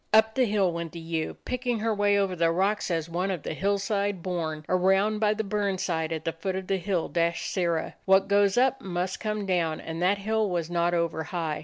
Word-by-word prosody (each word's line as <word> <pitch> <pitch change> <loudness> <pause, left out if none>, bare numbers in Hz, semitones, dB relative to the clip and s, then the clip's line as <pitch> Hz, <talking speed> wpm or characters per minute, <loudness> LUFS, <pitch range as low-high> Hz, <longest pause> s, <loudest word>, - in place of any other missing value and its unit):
Up 220 0 +5
the 255 +1 +3
hill 200 -4 +2
went 170 -1 -5
the 170 - -6
ewe, 165 -1 -3
picking 250 -1 -1
her 220 +1 0
way 205 -1 +3
over 195 -2 +1
the 165 -1 +2
rocks 195 +5 +1
as 165 -2 -1
one 180 +3 -2
to 190 - 0
the 155 - -5
hillside 200 +1 -1
born; 160 -4 -3
around 195 +4 +2
by 210 -1 +2
the 220 - -1
burn 200 -1 -1
side 160 -3 -1
at 160 0 -4
the 165 - +1
foot 185 +3 -4
of 190 0 -4
the 195 +1 0
hill 180 -2 -1
dashed 170 0 -1
Sirrah. 170 -4 0
What 190 0 +4
goes 200 0 +3
up 265 +1 +3
must 180 -2 -3
come 215 -2 -2
down; 170 -4 0
and 165 +1 -6
that 190 +3 +3
hill 215 +1 0
was 175 -2 -2
not 175 0 +1
over 165 -2 -1
high. 160 -2 -3
185 Hz, 225 wpm, -27 LUFS, 170-205 Hz, -, Up